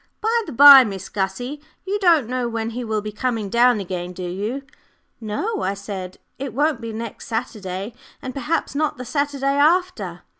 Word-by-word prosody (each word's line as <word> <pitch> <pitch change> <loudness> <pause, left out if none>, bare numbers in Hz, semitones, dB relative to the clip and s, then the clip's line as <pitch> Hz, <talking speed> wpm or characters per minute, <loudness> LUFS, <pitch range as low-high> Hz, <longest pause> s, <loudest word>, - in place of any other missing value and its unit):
"By 460 +2 +1
the - - -6
by, 275 +1 +10
Miss 195 -5 -6
Gussie, 210 +9 -3 0.2
you 400 +2 -1
don't 335 - +4
know 250 -1 -2
when 225 0 -3
he 245 +2 -5
will 220 -2 -1
be 215 - -5
coming 220 -1 -2
down 240 -1 +4
again, 180 -2 -5
do 180 - -7
you?" 210 +10 -4 0.6
"No," 240 - -3
I 195 +1 -1
said. 195 -2 -7 0.2
"It 265 -4 -5
won't 290 -3 +1
be 230 0 -5
next 225 0 -7
Saturday, 215 -3 -4 0.3
and 260 -3 -6
perhaps 290 +5 -2
not 300 -1 -1
the 250 - -7
Saturday 285 0 -2
after." 360 +5 +1
240 Hz, 180 wpm, -22 LUFS, 210-285 Hz, 0.6 s, by